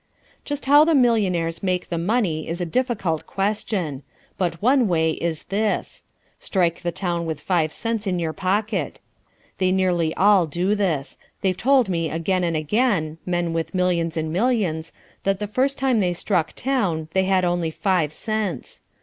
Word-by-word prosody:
Just 290 -2 -4
how 290 +2 +7
the 325 0 +3
millionaires 190 - +2
make 185 -2 -1
the 170 - -2
money 175 -5 0
is 165 +2 -3
a 175 - -1
difficult 195 -6 -1
question. 195 - -2 0.3
But 170 -3 -2
one 255 +1 +3
way 160 -3 +2
is 160 -1 -3
this. 210 +2 -2 0.4
Strike 175 -4 0
the 175 -1 -2
town 170 -1 -2
with 160 -2 -3
five 160 -1 0
cents 225 +3 -3
in 180 -2 0
your 165 -2 -2
pocket. 205 +5 -1 0.6
They 185 -1 +2
nearly 180 -4 +1
all 195 -3 +4
do 175 +6 0
this; 175 -10 -1 0.2
they've 190 -1 +1
told 255 +4 +3
me 165 -3 -1
again 180 +3 0
and 165 -2 0
again 165 - 0
(men 175 -2 0
with 165 +3 -3
millions 170 -2 0
and 160 0 -2
millions) 185 -7 0 0.3
that 195 0 +1
the 210 - -3
first 260 +7 0
time 260 -3 +2
they 180 -3 +1
struck 175 -3 0
town 195 -13 -1
they 190 0 +2
had 185 -1 +2
only 175 -2 0
five 170 -2 0
cents. 215 0 -4
185 Hz, 165 wpm, -23 LUFS, 165-210 Hz, 0.6 s, how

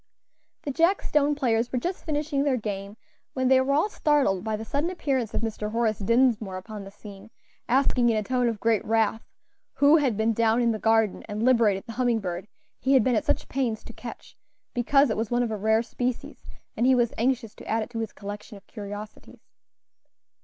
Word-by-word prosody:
The 285 - -3
jack 335 +8 +2
stone 295 0 +2
players 240 -4 0
were 255 - -1
just 355 +9 -3
finishing 295 -2 -1
their 280 -3 +1
game 205 -1 -5 0.4
when 260 -1 0
they 260 0 +6
were 265 +1 0
all 310 +8 +3
startled 285 - +1
by 220 -1 -1
the 220 +1 -6
sudden 285 +8 -1
appearance 270 - -2
of - - -1
Mr. 215 -2 -3
Horace 225 -3 0
Dinsmore 220 -3 +2
upon 205 +2 -8
the 195 - -9
scene, 205 0 -12 0.4
asking 250 -1 +3
in 225 - +2
a 215 - 0
tone 250 +2 +1
of 225 -3 -4
great 225 -1 +1
wrath 225 0 +1 0.5
who 285 +3 +6
had 260 -9 +1
been 220 +1 +2
down 225 +1 +2
in 235 -1 +2
the 215 - -3
garden 225 -2 +2
and 210 +2 -3
liberated 225 -6 +3
the 230 - -8
humming 240 -2 +2
bird 180 -1 -5 0.3
he 270 - +1
had 255 - +5
been 250 0 +2
at 215 - 0
such - - 0
pains 245 -5 -2
to 235 - -11
catch, 230 +1 -10 0.4
because 275 +2 +3
it - - -2
was 220 -1 -2
one 245 0 +1
of 230 - -2
a - - -1
rare 220 +2 +2
species, 245 +1 -4 0.3
and 240 - +2
he 260 - +5
was 240 -2 +1
anxious 245 -2 0
to - - -13
add 225 0 0
it 220 - -10
to 230 - -4
his 225 -2 -3
collection 205 +1 -8
of 195 - -18
curiosities. 205 0 -10
230 Hz, 210 wpm, -26 LUFS, 215-260 Hz, 0.5 s, they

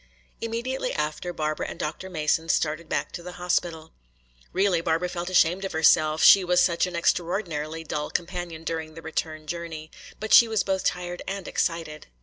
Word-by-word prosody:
Immediately 235 +4 -2
after 150 +3 -2
Barbara 155 -2 -2
and - - -7
Dr. 160 +5 -4
Mason 160 -1 0
started 155 +1 0
back - - -1
to - - -7
the 180 +1 -8
hospital. 175 -2 -2 0.6
Really, 185 -2 +2
Barbara 165 +1 0
felt 175 0 -4
ashamed 180 +1 +3
of 195 - -4
herself, 155 -1 +4
she 195 - +9
was 180 0 +3
such 170 +1 +3
an 180 - -6
extraordinarily 165 -2 -1
dull 150 -1 -3
companion 175 -2 -4
during 160 -1 -4
the 165 - -10
return 155 -1 -4
journey. 160 -1 -6 0.3
But 215 0 -1
she 235 - +9
was 220 -3 +1
both 190 -1 -1
tired 175 0 -2
and 195 -1 -4
excited. 165 -3 -2
170 Hz, 170 wpm, -26 LUFS, 160-180 Hz, 0.6 s, she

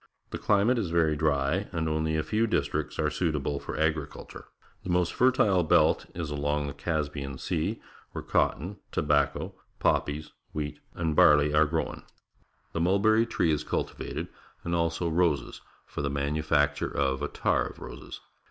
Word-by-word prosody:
The - - -4
climate 105 +4 +3
is 100 -7 -2
very 80 -2 +2
dry, 75 +5 0
and 80 -3 -1
only 80 0 0
a 80 - 0
few 110 +5 +1
districts 110 - -1
are 75 -1 +1
suit 80 +1 0
able 70 0 -2
for - - -6
agriculture. 80 -2 -3 0.4
The - - -6
most 90 -1 +1
fertile 110 -7 +3
belt 80 - +3
is 85 -4 -4
along 75 0 -1
the 70 - -5
Caspian 70 -3 -3
Sea, - - -2 0.3
where - - -6
cotton, 90 +8 0
tobacco, 70 -1 +1 0.2
poppies, 75 +1 0 0.2
wheat, 75 -1 -4 0.2
and 80 -2 -1
barley 75 0 +6
are 75 +1 +5
grown. 80 +1 -2 0.7
The 85 - -1
mulberry 110 +6 +3
tree 85 -7 +1
is 75 - 0
cultivated, - - -3 0.4
and 85 - -3
also 85 0 0
roses 80 -5 0 0.2
for - - -5
the 70 - -1
manufacture 75 +1 0
of 65 0 0
attar 75 - 0
of - - -11
roses. - - -9
80 Hz, 155 wpm, -28 LUFS, 75-85 Hz, 0.7 s, barley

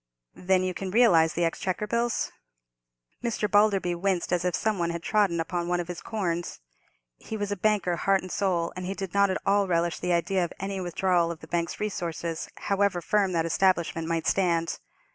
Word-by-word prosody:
"Then 185 0 +1
you 185 0 -1
can 190 +1 -5
realize 175 -8 +5
the 170 - +1
Exchequer 185 +4 -2
bills?" 235 +2 -1 0.9
Mr. 230 -3 0
Balderby 205 -4 +3
winced 180 0 -1
as 175 -1 +1
if 180 -1 0
some 215 -3 0
one 170 -1 0
had 170 0 -4
trodden 200 -6 +2
upon 170 +1 -2
one 175 0 0
of 175 - -3
his 175 - -5
corns. 175 -6 -3 0.6
He 220 - -6
was 205 -1 -3
a - - 0
banker 195 -4 +1
heart 195 +1 +2
and 185 - -8
soul, 175 -4 0
and 185 0 -5
he 195 - -3
did 195 -3 -5
not 200 0 +4
at 185 - 0
all 200 0 +3
relish 170 -1 0
the 180 0 0
idea 180 +2 +1
of 170 - -4
any 195 0 -3
withdrawal 175 -1 +1
of 170 -2 -6
the 160 - -11
bank's 170 0 -2
resources, 170 -5 -3
however 200 -2 +1
firm 195 +2 +1
that 165 -1 +1
establishment 170 -2 +1
might 165 -1 -1
stand. 170 -3 +1
180 Hz, 200 wpm, -27 LUFS, 170-200 Hz, 0.9 s, realize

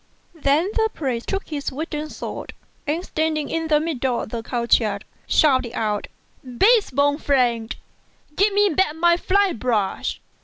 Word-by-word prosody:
Then 320 +4 +1
the 445 -1 +2
priest 255 -6 -3
took 390 0 -3
his 290 -3 -3
wooden 305 +2 -4
sword, - - -7 0.3
and 325 +5 -1
standing 310 -2 -1
in 325 0 -1
the 300 -1 +4
middle 265 -6 -1
of - - -7
the 230 +1 -4
court 235 +1 +2
yard, 210 -3 -3 0.2
shouted^ 260 -5 +3
out, 210 -2 -1 0.4
"Base 400 - +3
born 285 +3 +1
fiend, 240 -6 +1 0.6
give 405 +4 +3
me 410 0 +3
back 315 -2 +1
my 340 +1 +4
fly 390 +2 +2
brush!" 220 -5 -1
295 Hz, 155 wpm, -22 LUFS, 245-335 Hz, 0.6 s, the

